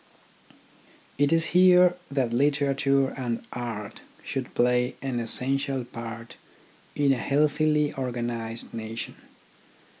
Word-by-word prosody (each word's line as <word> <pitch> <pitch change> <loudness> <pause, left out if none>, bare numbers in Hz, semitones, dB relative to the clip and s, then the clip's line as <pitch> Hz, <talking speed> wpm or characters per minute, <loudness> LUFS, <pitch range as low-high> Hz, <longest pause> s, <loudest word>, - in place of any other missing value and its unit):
It 145 0 +3
is 165 0 +4
here 180 0 +6
that 130 -4 0
literature 140 0 +2
and 120 -3 -4
art 115 -4 -5 0.2
should 130 -2 -5
play 125 +1 +2
an 130 -3 -2
essential 130 +2 -2
part 115 -1 -8 0.6
in 140 -2 +3
a - - -1
healthily 150 +2 +2
organised 120 -3 -4
nation. 115 0 -5
130 Hz, 100 wpm, -26 LUFS, 120-145 Hz, 0.6 s, here